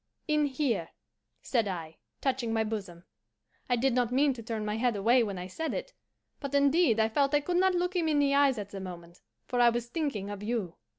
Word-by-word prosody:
'In 300 -1 +2
here,' 255 - -1 0.5
said 230 -5 +1
I, 165 -4 -5 0.2
touching 255 -4 0
my 225 0 +1
bosom. 200 -6 -5 0.7
I 245 - +3
did 255 +2 +1
not 245 -1 +1
mean 275 +2 +3
to 240 - -9
turn 220 -1 -4
my 210 +1 -2
head 240 -1 +1
away 235 +5 +4
when 200 -4 -2
I 180 - -5
said 320 - -4
it, - - -5 0.5
but 280 -1 -4
indeed 280 -4 +4
I 220 - +4
felt 280 +5 +1
I - - +5
could 350 +4 -1
not 375 0 +3
look 360 +1 -1
him 340 -3 +1
in 305 -2 +2
the 285 -1 +3
eyes 280 -3 +4
at 205 -1 -6
the 195 - -6
moment, 175 -2 -9 0.2
for 245 - -2
I 240 - +7
was 240 0 -3
thinking 240 -10 -2
of 205 -1 -6
you. 210 -5 -2
240 Hz, 225 wpm, -29 LUFS, 210-285 Hz, 0.7 s, I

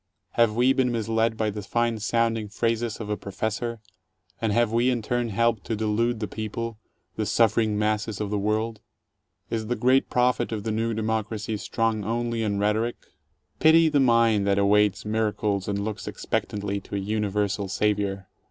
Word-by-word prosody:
Have 115 -2 +3
we 125 +3 +4
been 130 -2 +1
misled 115 0 0
by 110 -1 0
the 105 +1 -5
fine 115 +2 0
sounding 115 0 0
phrases 115 +1 -1
of 110 - -5
a - - +1
Professor, 110 +4 -4 0.6
and 110 -2 +1
have 115 +1 +2
we 120 +2 +3
in 120 -3 0
turn 120 +1 -1
helped 115 -1 +1
to 115 - -1
delude 110 +2 0
the 105 - -2
people, 110 +2 -5 0.4
the - - 0
suffering 110 -2 +2
masses 105 0 -1
of 105 -1 -3
the 105 - 0
world? 110 +2 -1 0.7
Is 110 -1 -2
the 120 - 0
great 130 +4 +3
prophet 125 -2 +1
of 105 -2 -3
the 110 - -2
New 115 +1 -1
Democracy 110 0 -2
strong 110 0 -1
only 115 +2 -1
in 105 -2 0
rhetoric? 105 +4 +1 0.6
Pity 160 +1 +6
the 145 - +2
mind 115 -5 +4
that 100 0 +2
awaits 100 0 +3
miracles 105 -2 -1
and 100 0 -1
looks 110 -1 -5
expectantly 100 -1 -2
to 100 - -8
a - - 0
universal 105 0 -1
Savior. 100 -1 -1
110 Hz, 170 wpm, -25 LUFS, 105-115 Hz, 0.7 s, Pity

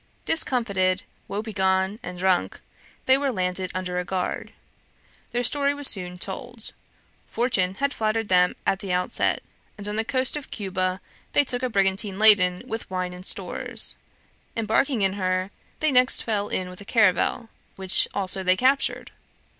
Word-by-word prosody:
Discomfited, 200 -11 +1 0.2
woebegone, 195 -1 -1
and 180 -6 -7
drunk, 180 - 0 0.5
they 260 +1 +4
were 280 -1 0
landed 185 -2 -1
under 180 -1 -2
a - - -2
guard. 180 0 -3 0.8
Their 245 0 -2
story 285 +3 +3
was 290 0 0
soon 180 -2 +2
told. 220 +6 -5 0.5
Fortune 190 -6 0
had 280 +4 -1
flattered 220 0 -1
them 180 -1 +3
at 195 - +1
the 195 -2 -5
outset, 180 0 +1 0.3
and 205 0 -7
on 210 +1 -3
the 220 - +2
coast 255 +3 0
of 295 -2 -6
Cuba 185 -2 -2 0.3
they 290 - +5
took 250 -2 -4
a 255 - -1
brigantine 195 -1 0
laden 195 -4 +5
with 225 -3 -6
wine 185 -1 -3
and 180 0 -10
stores. - - 0 0.6
Embarking 225 +2 +1
in 190 -1 +2
her, 185 0 -1 0.3
they 310 -1 +2
next 250 -1 +5
fell 210 -2 -2
in 185 - -2
with 180 +2 -11
a - - -8
caravel, 220 +2 +1 0.3
which 190 -1 +3
also 190 -1 -1
they 185 0 +2
captured. 265 +4 +1
200 Hz, 155 wpm, -24 LUFS, 185-235 Hz, 0.8 s, they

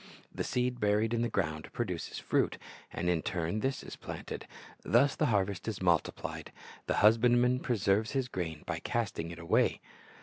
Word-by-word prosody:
The - - -2
seed 125 -1 -1
buried 105 +2 +2
in 115 - +1
the 120 - +1
ground 80 -7 -2
produces 100 -9 -3
fruit, - - +1 0.3
and 90 - -3
in 85 -2 +2
turn 85 +4 -2
this 135 +4 -1
is - - -8
planted. - - -7 0.3
Thus 135 +4 +3
the - - +2
harvest 100 -4 0
is 110 -3 -2
multiplied. 85 -3 0 0.4
The - - +1
husbandman 120 +3 +5
pre 125 -3 -1
serves 100 +4 +2
his 135 -2 0
grain 80 -9 -4
by - - -3
casting 100 -8 -2
it 85 - -8
away. 85 0 +2
105 Hz, 170 wpm, -31 LUFS, 90-120 Hz, 0.4 s, husbandman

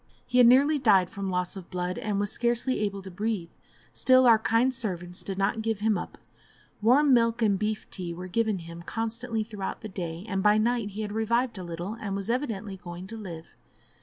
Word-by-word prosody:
He 250 - +1
had 245 - +8
nearly 285 +5 +5
died 195 -8 +4
from 200 -1 -4
loss 180 0 -2
of 185 -3 -9
blood, 180 +2 -3
and 210 -4 -1
was 205 -1 0
scarcely 240 +2 0
able 200 -2 -2
to 190 - -8
breathe; 200 -3 -3 0.4
still, 255 0 +5
our 230 -2 +7
kind 230 +4 +2
servants 180 -7 -4
did 195 -1 -5
not 200 +3 0
give 220 -2 -1
him 215 0 +2
up; 175 - -5 0.6
warm 265 +6 +5
milk 230 -1 +3
and 200 -3 +2
beef 215 0 -2
tea 180 -2 -4
were 180 +2 -7
given 215 +2 0
him 170 0 -9
constantly 225 +3 -3
through 210 -2 -10 0.2
the 215 - -6
day; 175 -2 -5
and 195 -3 -1
by 210 +2 +5
night 230 -1 +1
he 210 +2 -5
had 205 - -4
revived 230 +1 0
a - - -5
little, 175 +4 -5
and 205 -3 -4
was 195 +3 -2
evidently 220 -6 -3
going 175 0 -8
to 225 - -8
live. 170 -7 -8
210 Hz, 210 wpm, -27 LUFS, 190-230 Hz, 0.6 s, had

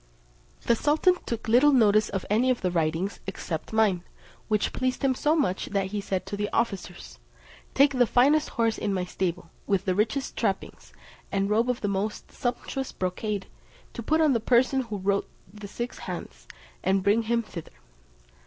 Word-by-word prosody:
The 235 - +2
sultan 310 +8 +3
took 230 -1 -4
little 250 +6 +6
notice 215 -5 +4
of 195 -2 -3
any 230 +5 +2
of 255 - +1
the 180 - 0
writings, 165 +3 -1
except 170 -4 -5
mine, 210 -5 +2 0.4
which 215 -2 0
pleased 255 +1 -1
him 270 -1 +3
so 300 +4 +1
much 265 - 0
that 195 -1 -1
he 210 -1 -2
said 190 -2 -3
to - - -5
the 205 0 -2
officers, 180 - -3 0.6
"Take 280 +1 +5
the 250 -2 +3
finest 290 +7 +4
horse 230 -1 +1
in 200 -2 -1
my 180 -1 -1
stable, 180 -2 -3 0.2
with 195 -1 +1
the 185 - +2
richest 220 +8 -1
trappings, 200 -4 -3 0.4
and 195 0 +1
a - - -3
robe 230 +3 +2
of 250 - -1
the 205 - -1
most 200 +2 -3
sumptuous 260 +1 -3
brocade 195 +2 -3 0.5
to - - -5
put 315 +8 +2
on 305 -3 +4
the 235 - +2
person 255 +3 +3
who 220 -5 -5
wrote 200 +1 0 0.2
the 210 -1 -9
six 240 +4 -5
hands, 60 - -7 0.4
and 190 +1 +2
bring 205 +4 +3
him 230 +1 0
thither." 170 -6 -9
210 Hz, 180 wpm, -26 LUFS, 190-245 Hz, 0.6 s, little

